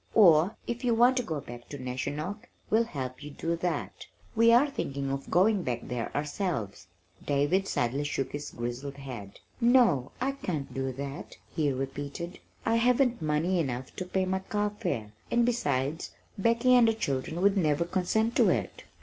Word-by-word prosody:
"Or 180 -2 +6
if 240 +1 -4
you 240 -2 +3
want 245 +3 +5
to - - +3
go 160 -10 -3
back 120 -1 -10
to 145 - -6
Neshonoc, 145 - -4 0.2
we'll 225 +2 +4
help 130 - -5
you 150 - -7
do 165 +3 -2
that. 175 +1 -3 0.3
We 230 +1 +6
are 245 +5 +6
thinking 140 - -3
of 135 0 -4
going 195 +3 +4
back 120 -6 -2
there 125 -2 -4
ourselves." 145 - -3 0.4
David 145 +7 +1
sadly 125 +4 0
shook 140 -2 -2
his 145 0 -5
grizzled 120 +4 -5
head. 120 -8 -8 0.2
"No, 235 - +4
I 265 +2 +1
can't 175 - -4
do 135 0 -2
that," 140 +2 -7 0.2
he 150 -4 +2
repeated. 140 +6 -5 0.3
"I 225 +1 +3
haven't 245 -1 +3
money 160 +4 +1
enough 130 -4 -3
to 185 - -3
pay 190 +1 0
my 190 +1 0
carfare, 205 - -2 0.2
and 235 0 +3
besides, 160 - 0 0.3
Becky 230 +5 +3
and 245 -2 +7
the 225 - +2
children 150 -4 -2
would 200 +2 +4
never 160 -3 +2
consent 210 +6 0
to - - +5
it." - - -2
165 Hz, 170 wpm, -29 LUFS, 135-220 Hz, 0.4 s, and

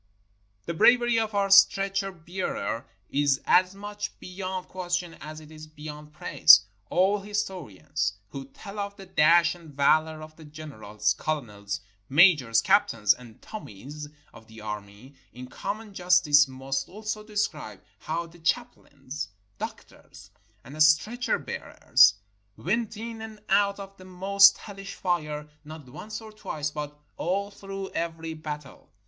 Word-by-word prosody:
The - - -3
bravery 240 +5 +5
of 220 -2 -2
our 200 -1 +1
stretcher 195 0 +5
bearers 175 -8 -4 0.3
is 140 -1 +2
as 185 +1 +4
much 205 +1 -6
be - - -12
yond 185 -1 -4
question 175 -2 -3
as 155 0 -8
it 155 0 -14
is 155 0 -11
beyond 150 0 -10
praise. 95 - +7 0.3
All 190 +3 +3
historians 185 - -3 0.2
who 135 +4 -7
tell 200 +9 -10
of 200 0 -4
the 195 -1 -11
dash 170 -1 +4
and 170 -3 -14
valor 155 +3 +2
of 155 0 -13
the 160 - -13
generals, 110 -9 -3
colonels, 105 -7 -4 0.3
ma 155 +6 +7
jors, 115 -5 +1
captains, 170 - +4
and 120 -2 -15
"Tommies" 145 - -9 0.2
of 110 -1 -15
the 110 0 -13
army, 105 +4 -8 0.2
in 125 +1 -8
common 210 - -6
justice 175 -6 +5
must 135 +1 -4
also 215 +2 -5
describe 205 - -3 0.2
how 165 +7 -3
the 170 +1 -16
chaplains, 150 - -3 0.3
doctors, - - -9 0.3
and 145 +5 -6
stretcher 155 +11 +3
bearers 100 - +3 0.4
went 220 +4 -1
in 225 0 -6
and 220 -1 -9
out 200 0 +3
of 195 0 -10
the 185 - -13
most 195 +2 +5
hellish 195 -1 -9
fire, 150 -5 -2 0.2
not 155 -2 -10
once 210 - -8
or 220 -1 -11
twice, 150 -8 -4
but 150 0 -6 0.2
all 200 +4 -1
through 195 -1 -7
every 165 -1 -3
battle. 150 -3 -8
165 Hz, 140 wpm, -27 LUFS, 145-195 Hz, 0.4 s, praise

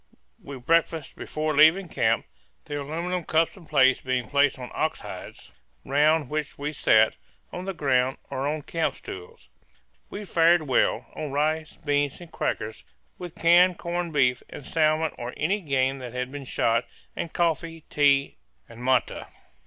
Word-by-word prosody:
We 140 -1 -8
breakfasted 165 +2 0
before 155 0 -3
leaving 160 +6 +6
camp, - - +1 0.4
the 145 -1 -4
aluminum 170 +5 -3
cups 160 +1 +1
and 175 -5 -15
plates 130 -3 +4
being 130 -3 -1
placed 140 +2 +2
on 125 -1 -8
ox 155 - -1
hides, - - -9 0.3
round 150 +2 +3
which 150 +1 -4
we 145 +1 -3
sat, 110 -5 +4 0.4
on 180 - -5
the 195 - -3
ground 130 -4 +1
or 135 +1 -2
on 150 0 -2
camp 165 +2 -1
stools. 425 +5 -10 0.6
We 205 +1 -7
fared 170 -2 +4
well, 135 -4 +1
on 150 -3 -5
rice, 155 +2 -1
beans, 145 -1 -1
and 175 -2 -12
crackers, 110 -6 -3 0.4
with 175 -2 -8
canned 175 +1 +5
corned 175 0 -3
beef, 125 -3 +2
and 140 - -9
salmon 155 0 +1
or 120 +1 -6
any 195 +7 0
game 135 -3 0
that 125 -2 -8
had 125 0 -3
been 145 -1 -7
shot, 115 -1 +1 0.3
and 165 - -4
coffee, 165 -1 -1
tea, 140 -1 +3 0.3
and 115 +1 -11
matte. 130 -1 +1
150 Hz, 160 wpm, -25 LUFS, 135-165 Hz, 0.6 s, leaving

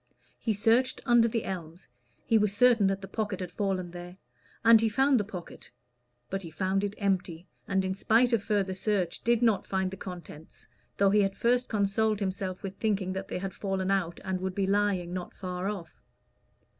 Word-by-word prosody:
He 230 - -1
searched 230 +5 +2
under 240 -2 +5
the 230 -1 -1
elms 175 -1 -6 0.4
he 225 - +2
was 205 -1 +1
certain 235 -4 +5
that 195 0 -1
the 195 - -7
pocket 205 -1 -3
had 180 -2 -5
fallen 185 -2 -2
there 175 +1 -9 0.5
and 225 -1 +8
he 225 - +2
found 265 +3 +3
the - - 0
pocket; 190 -4 -9 0.6
but 195 0 -3
he 170 - -8
found 190 +4 -1
it 205 0 -2
empty, 185 -4 -1 0.2
and, 190 -1 +1
in 190 - -1
spite 230 +5 +3
of 230 - +3
further 200 -2 0
search, 190 -2 -1
did 235 0 +2
not 225 -4 +3
find 190 -1 -1
the 195 - -7
contents, 175 -4 -9 0.3
though 200 -1 +4
he 210 0 +4
had 195 -1 -1
first 245 +1 +2
consoled 215 0 +1
himself 190 -1 -3
with 195 -1 -6
thinking 200 -4 0
that 190 0 -5
they - - -4
had 190 0 -4
fallen 195 -1 -2
out, 175 -4 0
and 185 -1 -2
would 190 -1 -3
be 195 - +1
lying 195 -3 +1
not 180 -1 -5
far 185 0 -4
off. 175 -6 -7
195 Hz, 195 wpm, -29 LUFS, 185-215 Hz, 0.6 s, and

